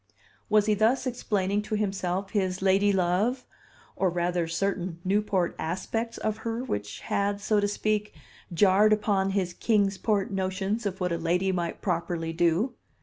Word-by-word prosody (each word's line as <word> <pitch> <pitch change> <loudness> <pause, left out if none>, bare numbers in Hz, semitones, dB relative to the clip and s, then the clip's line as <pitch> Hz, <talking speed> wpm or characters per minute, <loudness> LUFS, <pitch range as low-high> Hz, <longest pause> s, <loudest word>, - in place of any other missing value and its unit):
Was 210 -1 +4
he 215 - +3
thus 225 +6 +2
explaining 205 -5 0
to 215 +1 -3
himself 195 -2 -2
his 190 -3 -1
lady 195 +1 +4
love, 195 +7 +1 0.5
or 190 - +1
rather 175 0 0
certain 180 0 -2
Newport 195 -2 +1
aspects 225 +8 -3
of 215 0 -2
her 230 +2 -3
which 105 - -4
had, 200 0 -1
so 210 0 +1
to 205 - +1
speak, 210 0 -1 0.4
jarred 200 +4 +5
upon 200 -2 +1
his 190 -3 -1
Kings 200 -3 +1
Port 210 0 0
notions 195 +3 -1
of 190 -1 -5
what 180 -1 0
a 170 - -1
lady 180 +3 +1
might 175 -2 -3
properly 170 -2 -1
do? 175 +9 +1
195 Hz, 155 wpm, -27 LUFS, 180-210 Hz, 0.5 s, jarred